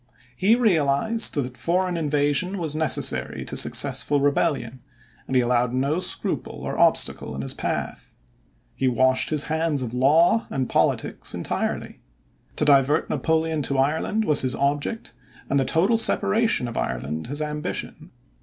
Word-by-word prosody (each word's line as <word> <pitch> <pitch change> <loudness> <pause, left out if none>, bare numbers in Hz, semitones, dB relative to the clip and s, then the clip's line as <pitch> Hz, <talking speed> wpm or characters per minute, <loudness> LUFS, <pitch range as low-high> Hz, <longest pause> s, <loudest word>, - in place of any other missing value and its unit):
He 200 - +3
realized 220 - +1
that 125 -3 -3
foreign 180 +4 -1
invasion 150 +4 0
was 160 -5 0
necessary 155 -3 +1
to - - -6
successful 140 +1 +2
rebellion, 140 -3 -1 0.5
and 130 - -3
he 125 - +4
allowed 120 0 0
no 140 +6 0
scruple - - -3
or - - -4
obstacle - - +1
in 70 - -5
his 70 - 0
path. - - -5 0.6
He 135 - -1
washed 130 +1 +2
his 150 -2 +1
hands 160 -3 -1
of 120 -1 -6
law 155 - +3
and 130 -2 -2
politics - - -1
entirely. - - -4 0.6
To 150 - 0
divert 145 +1 +3
Napoleon 160 -1 0
to 140 0 -1
Ireland 160 +10 0
was 150 -5 +3
his 130 -1 0
object 145 - -2 0.4
and 140 - +2
the 135 - 0
total 190 - +2
separation 225 - +2
of 115 - -7
Ireland 65 - -4
his 145 +3 -3
ambition. 150 0 -5
145 Hz, 145 wpm, -23 LUFS, 130-165 Hz, 0.6 s, he